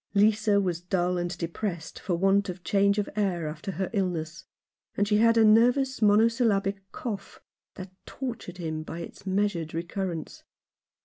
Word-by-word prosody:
Lisa 210 0 +4
was 180 -4 -1
dull 180 0 0
and 175 +1 -3
depressed 170 0 -4
for 180 - -1
want 195 +2 +2
of 180 0 -7
change 200 +4 +2
of 205 - 0
air 185 -6 0
after 160 +6 -5
her 190 0 -2
illness; 170 -5 -2 0.5
and 205 - +2
she 210 0 +3
had 230 +1 +4
a 225 - +6
nervous 245 +5 +4
monosyllabic 205 -2 +2
cough 215 -5 -6 0.4
that 185 -1 -8 0.2
tortured 235 -9 -6
him 160 -3 -4
by 160 +1 -7
its 170 +3 -9
measured 190 -5 -1
recurrence. 170 -1 -4
195 Hz, 150 wpm, -27 LUFS, 175-210 Hz, 0.5 s, a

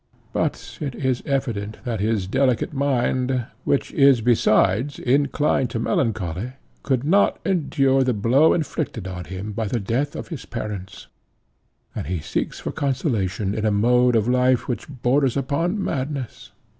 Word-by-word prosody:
But - - -2
it 140 -4 -3
is 130 -3 -1
evident 115 -7 -2
that 115 -4 -3
his 105 -2 0
delicate 130 +7 +1
mind, 130 -2 0 0.2
which 140 - +1
is 135 -4 +5
besides 115 +2 +2
inclined 140 0 +1
to 115 - -3
melancholy, 110 -2 -1 0.3
could 130 -2 0
not 195 +7 +3
endure 140 -7 +2
the 125 -2 +1
blow 125 +9 +4
inflicted 150 - -3
on 90 -2 -6
him 95 +3 -6
by 110 +1 -2
the 120 +4 -1
death 115 +8 -1
of - - -6
his 160 -7 -6
parents, 105 -5 -6 0.9
and - - -5
he 90 +1 -1
seeks - - -3
for - - -4
consolation 105 - -1
in 110 - -3
a 110 - +3
mode 125 +4 +3
of 110 -1 +2
life 125 0 +2
which 125 - -4
borders 135 0 +1
upon 165 - -1
madness. 135 -3 -4
125 Hz, 150 wpm, -23 LUFS, 110-140 Hz, 0.9 s, is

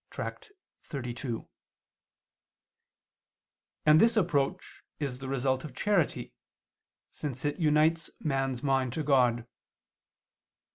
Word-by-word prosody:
xxxii]: 130 - -6 2.5
and 155 +1 +7
this 230 0 +4
approach 155 -8 0 0.2
is 135 -4 -3
the 135 - -6
result 130 0 0
of 140 -5 -9
charity, 200 -7 0 0.8
since 135 -2 -5
it 145 0 -1
unites 155 +1 +3
man's 135 -3 -1
mind 135 -3 +1
to 155 - -2
God. 125 -5 +3
140 Hz, 90 wpm, -29 LUFS, 130-155 Hz, 2.5 s, and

